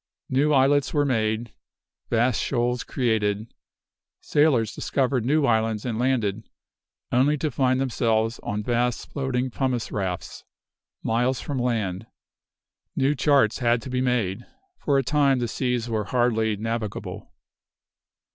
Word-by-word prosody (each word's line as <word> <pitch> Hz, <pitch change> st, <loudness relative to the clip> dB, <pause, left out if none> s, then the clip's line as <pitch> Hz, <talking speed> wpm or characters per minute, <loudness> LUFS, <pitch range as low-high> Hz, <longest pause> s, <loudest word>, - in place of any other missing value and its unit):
New 140 Hz, +4 st, +2 dB
islets 140 Hz, +1 st, +3 dB
were 145 Hz, -1 st, +3 dB
made; 110 Hz, -3 st, -1 dB, 0.6 s
vast 120 Hz, 0 st, +2 dB
shoals 125 Hz, -1 st, 0 dB
created. 110 Hz, -3 st, -1 dB, 0.7 s
Sailors 140 Hz, -8 st, +2 dB
discovered 130 Hz, -3 st, 0 dB
new 145 Hz, +4 st, +2 dB
islands 110 Hz, -2 st, +1 dB
and 115 Hz, -3 st, -2 dB
landed, 115 Hz, -5 st, 0 dB, 0.7 s
only 140 Hz, +5 st, +3 dB
to 150 Hz, +1 st, -2 dB
find 130 Hz, 0 st, +1 dB
themselves 115 Hz, -3 st, 0 dB
on 105 Hz, +1 st, -3 dB
vast 120 Hz, +1 st, -1 dB
floating 130 Hz, -2 st, -2 dB
pumice 125 Hz, -2 st, -2 dB
rafts, 95 Hz, -4 st, -4 dB, 0.6 s
miles 125 Hz, +3 st, +1 dB
from 140 Hz, -3 st, -3 dB
land. 110 Hz, -5 st, -1 dB, 0.9 s
New 135 Hz, +2 st, +2 dB
charts 140 Hz, -6 st, +3 dB
had 120 Hz, -1 st, +2 dB
to 130 Hz, -, -7 dB
be 125 Hz, 0 st, 0 dB
made. 120 Hz, -4 st, 0 dB, 0.4 s
For 140 Hz, -2 st, +1 dB
a 135 Hz, -, +2 dB
time 140 Hz, 0 st, +3 dB
the 120 Hz, -1 st, -1 dB
seas 125 Hz, -1 st, -1 dB
were 110 Hz, -3 st, -1 dB
hardly 110 Hz, -3 st, +1 dB
navigable. 115 Hz, 0 st, -4 dB
120 Hz, 130 wpm, -24 LUFS, 110-130 Hz, 0.9 s, islets